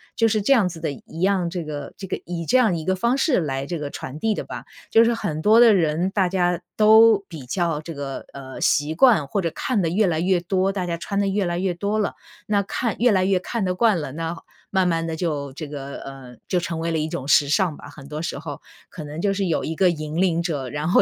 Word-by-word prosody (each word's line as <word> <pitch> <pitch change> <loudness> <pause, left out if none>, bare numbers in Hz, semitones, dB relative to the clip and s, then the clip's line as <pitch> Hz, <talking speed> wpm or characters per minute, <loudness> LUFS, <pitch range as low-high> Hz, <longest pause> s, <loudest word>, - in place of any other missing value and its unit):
就 225 - +3
是 215 0 +1
这 275 - +5
样 215 -8 +3
子 170 -2 -9
的 160 -2 -2
一 150 +3 -11
样， 190 -2 +2
这 175 0 -4
个 145 -2 -6
这 195 - -7
个 - - -4
以 170 -1 -4
这 255 - +3
样 215 -9 +3
一 160 - -6
个 190 - +1
方 235 +7 +1
式 275 - +2
来 135 -3 -3
这 170 +3 -4
个 145 -1 -4
传 140 +1 -7
递 220 +4 0
的 - - -4
吧。 - - -8 0.3
就 225 - +7
是 235 0 +2
很 160 -9 -3
多 215 +6 +5
的 235 -2 +7
人 170 0 +1
大 190 -2 +1
家 175 -2 0 0.2
都 220 -1 +6
比 155 -7 -9
较 165 +1 -1
这 165 +1 -7
个， 140 -1 -5
呃， 130 -1 -9
习 145 +2 +2
惯 200 - +5
或 200 +8 -1
者 165 -2 -1
看 220 -6 -1
得 165 - 0
越 205 +6 +2
来 165 -4 0
越 180 +1 +2
多， 185 +2 0
大 190 -2 -3
家 170 -1 -2
穿 200 +4 -3
得 200 - +1
越 200 +1 0
来 175 -1 -1
越 185 0 0
多 200 +5 -2
了， 210 - 0 0.3
那 205 -1 +1
看 225 +3 -2
越 245 0 +4
来 190 -2 +2
越 190 -1 +3
看 225 +1 -2
得 180 0 -1
惯 215 -3 +3
了， 150 -4 -5
那 165 +2 -4 0.4
慢 190 -2 +3
慢 165 -1 0
地 165 - -3
就 150 -5 -2
这 155 +2 -7
个 140 -1 -7
呃， 130 -3 -10
就 185 - 0
成 170 -1 -4
为 165 +1 -2
了 165 - 0
一 155 +1 -2
种 135 -3 -5
时 145 0 +4
尚 175 0 +2
吧。 145 - -12
很 140 -1 -12
多 150 +1 -5
时 160 - -4
候， 145 -2 -7 0.3
可 155 - -8
能 150 +2 -7
就 195 +2 +1
是 195 0 -1
有 165 - 0
一 160 - -3
个 185 +2 +4
引 155 -2 -4
领 170 -3 +2
者， 145 -7 -3
然 150 +4 -3
后 180 - +5
175 Hz, 290 characters per minute, -23 LUFS, 155-200 Hz, 0.4 s, 就